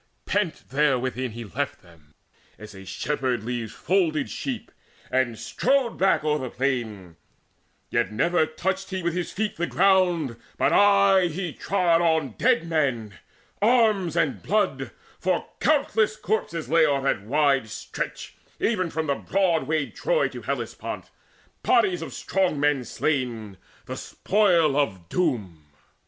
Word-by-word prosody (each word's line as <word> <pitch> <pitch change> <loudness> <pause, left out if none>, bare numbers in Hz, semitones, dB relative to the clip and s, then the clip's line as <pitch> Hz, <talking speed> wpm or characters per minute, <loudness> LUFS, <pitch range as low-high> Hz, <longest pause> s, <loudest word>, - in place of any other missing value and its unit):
Pent 205 -5 0
therewithin 130 -3 0
he 120 +1 -6
left 95 - -4
them, 75 -4 -21 0.4
as 105 0 -11
a 95 0 -11
shepherd 125 +4 -2
Leaves 120 -2 -4
folded 165 -4 0
sheep, 240 -4 -5 0.4
and 130 -3 +1
strode 260 - 0
back 190 -4 +3
o'er 150 -1 +1
the 130 -2 -4
plain; 110 -11 -3 0.7
Yet - - +1
never 160 +8 +2
touched 190 +5 -3
he 185 -2 -4
with 170 -1 0
his 175 -1 -3
feet 215 +1 -2
the 175 +1 -1
ground, 180 -9 +2 0.2
But - - +2
aye 200 -2 +5
he 170 -1 -4
trod 175 -4 +1
on 160 -5 +1
dead 165 +9 +1
men, 130 -10 0 0.5
arms, 215 -7 +3
and 165 -5 0
blood; 210 +2 0 0.3
For - - 0
countless 225 -8 +2
corpses 170 -7 -2
lay 165 +1 +4
o'er 140 -3 +2
that 135 - +1
wide 135 +1 +1
stretch - - -6 0.3
Even 185 -6 0
from 160 0 -2 0.2
broad 185 -4 +1
wayed 155 -3 -1
Troy - - +1
to - - -8
Hellespont, - - -5 0.5
Bodies 370 -3 +3
of - - -6
strong 185 -6 0
men 145 -3 +1
slain, 120 -10 -2 0.3
the - - -5
spoil 175 -8 +2
of 95 - -1
Doom. 105 - -1
155 Hz, 140 wpm, -25 LUFS, 125-190 Hz, 0.7 s, aye